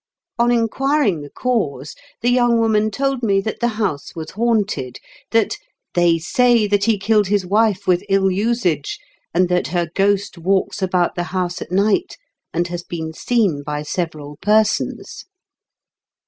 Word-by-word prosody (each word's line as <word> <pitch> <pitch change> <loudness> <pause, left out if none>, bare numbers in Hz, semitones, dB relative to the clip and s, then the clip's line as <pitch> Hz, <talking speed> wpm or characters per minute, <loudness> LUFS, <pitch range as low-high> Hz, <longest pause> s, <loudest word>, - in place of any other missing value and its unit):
On 240 0 +4
inquiring 240 - +1
the 145 - -9
cause, 155 - -2 0.3
the 240 +2 +2
young 240 -1 +3
woman 215 -1 +2
told 270 +4 -1
me 200 -4 +2
that 220 +2 -4
the 240 - +1
house 185 -10 -2
was 160 -1 -6
haunted 205 - -1 0.2
— - - -27
that 225 -2 +1 0.4
"they 175 -1 +3
say 235 +6 +3
that 205 -1 +1
he 225 -2 +2
killed 210 +1 +2
his 200 -1 +1
wife 205 0 +1
with 180 -1 +2
ill 195 -1 +3
usage, 190 - 0 0.3
and 180 +1 +2
that 180 0 +1
her 170 -1 -2
ghost 200 -1 0
walks 190 +3 0
about 180 -2 +1
the 175 - -3
house 180 -1 -2
at - - -7
night, 205 - +1 0.3
and 175 +1 -1
has 175 0 -4
been 160 -2 -6
seen 200 -7 0
by 150 +1 -4
several 150 -3 -4
persons." 215 +1 0
195 Hz, 160 wpm, -19 LUFS, 175-225 Hz, 0.4 s, On